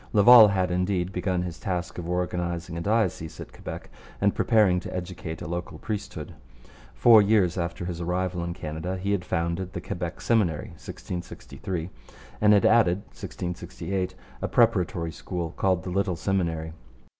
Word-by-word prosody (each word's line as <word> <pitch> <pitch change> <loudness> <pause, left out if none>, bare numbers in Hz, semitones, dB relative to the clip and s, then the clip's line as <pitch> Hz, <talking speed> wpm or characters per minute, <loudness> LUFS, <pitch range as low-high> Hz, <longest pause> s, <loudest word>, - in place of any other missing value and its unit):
Laval 110 +1 +9
had, 95 -2 0
indeed, 90 0 0
begun 90 -1 -1
his 85 -1 -6
task 90 -2 -3
of 85 -1 -5
organizing 85 -1 -2
a 85 - -3
diocese 100 -6 0
at - - -9
Quebec - - -8 0.3
and 100 0 +3
preparing 105 -6 +3
to - - -7
educate 90 -3 -5
a - - -5
local 85 +1 -4
priesthood. 105 -2 -5 0.6
Four 115 -3 +7
years 100 -4 +3
after 85 -1 -3
his 85 -1 -4
arrival 90 0 -1
in 85 0 -4
Canada 80 +4 -4
he 100 +2 -2
had 100 -3 0
founded 90 +1 -2
the - - -3
Quebec - - -5
Seminary 95 -11 +1
(1663) 90 0 -6 0.5
and 105 0 +6
had 100 -2 +5
added 100 -5 +4
(1668) 90 +1 -4 0.3
a - - -1
preparatory 90 -8 +2
school, 85 -1 -5
called 95 -3 +1
the 90 - -5
Little 95 -1 0
Seminary. 80 -3 -1
90 Hz, 155 wpm, -26 LUFS, 85-100 Hz, 0.6 s, Laval